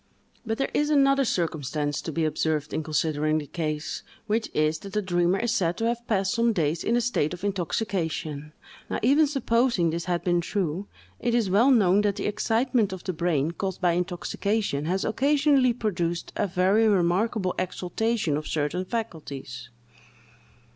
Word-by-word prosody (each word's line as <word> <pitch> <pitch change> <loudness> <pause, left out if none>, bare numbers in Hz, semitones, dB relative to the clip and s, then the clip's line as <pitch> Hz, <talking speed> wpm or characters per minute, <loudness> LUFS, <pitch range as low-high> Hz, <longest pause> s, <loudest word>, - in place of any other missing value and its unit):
But 225 0 -1
there 270 - -1
is 295 0 +1
another 275 -2 +4
circumstance 150 - -1
to 160 - -5
be 160 +1 0
observed 155 -1 -1
in - - 0
considering 155 0 0
the 150 - -3
case, 155 -1 -3 0.2
which 220 +2 -1
is, 155 +1 +1
that 195 +2 -10
the 210 - +1
dreamer 175 0 +2
is 235 +2 0
said 180 -6 0
to 225 - -1
have 235 0 -2
passed 195 -3 +1
some 235 -1 +2
days 160 -2 0
in 235 - +1
a 240 - +3
state 225 -9 0
of 180 - -16
intoxication. 170 -6 -2 0.4
Now, - - -1
even 290 +6 +5
supposing 235 - +1
this 170 +1 -3
had 175 -1 -1
been 175 -1 +2
true, 185 0 -2 0.3
it 240 0 0
is 220 -6 +1
well 225 +8 +5
known 205 -6 +5
that 205 -1 +1
the 205 - -4
excitement 225 +1 +1
of 190 -2 -7
the 185 - -3
brain 160 -2 0
caused 190 +1 -4
by 180 -2 +3
intoxication 180 -1 -1
has 185 +4 0
occasionally 275 +1 +3
produced 175 -8 -2
a 205 - 0
very 195 +4 +3
remarkable 190 +1 +1
exaltation 185 -1 -1
of 155 - -5
certain 160 +4 -1
faculties. 140 - -6
185 Hz, 170 wpm, -26 LUFS, 160-225 Hz, 0.4 s, even